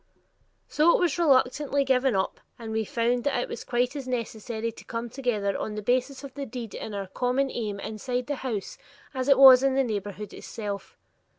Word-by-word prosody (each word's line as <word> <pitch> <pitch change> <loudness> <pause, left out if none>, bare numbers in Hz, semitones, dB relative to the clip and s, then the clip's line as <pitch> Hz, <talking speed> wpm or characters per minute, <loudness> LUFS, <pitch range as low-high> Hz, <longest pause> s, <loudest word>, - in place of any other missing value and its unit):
So 315 +3 +4
it - - -4
was 350 -4 +1
reluctantly 280 -1 +3
given 260 -2 +2
up, 190 - -1 0.2
and 225 -2 -7
we 220 0 -1
found 240 +3 0
that 280 -3 +1
it - - -2
was - - -6
quite 245 +2 0
as 275 -3 -5
necessary 230 -2 -3
to - - -14
come 230 0 -5
together 215 -7 -1
on 210 - -4
the 210 - -5
basis 255 +4 0
of 275 -2 -8
the 280 -1 -5
deed 235 -2 -7
and 210 - -6
our 200 -1 -3
common 250 +7 0
aim 210 -4 -3
inside 245 +5 -3
the 290 +1 -3
household 255 - -5 0.3
as 260 0 -2
it 275 - +6
was 265 -2 +10
in 270 -1 +2
the 270 - +3
neighborhood 205 -2 -4
itself. 205 -3 -6
245 Hz, 200 wpm, -27 LUFS, 220-270 Hz, 0.3 s, was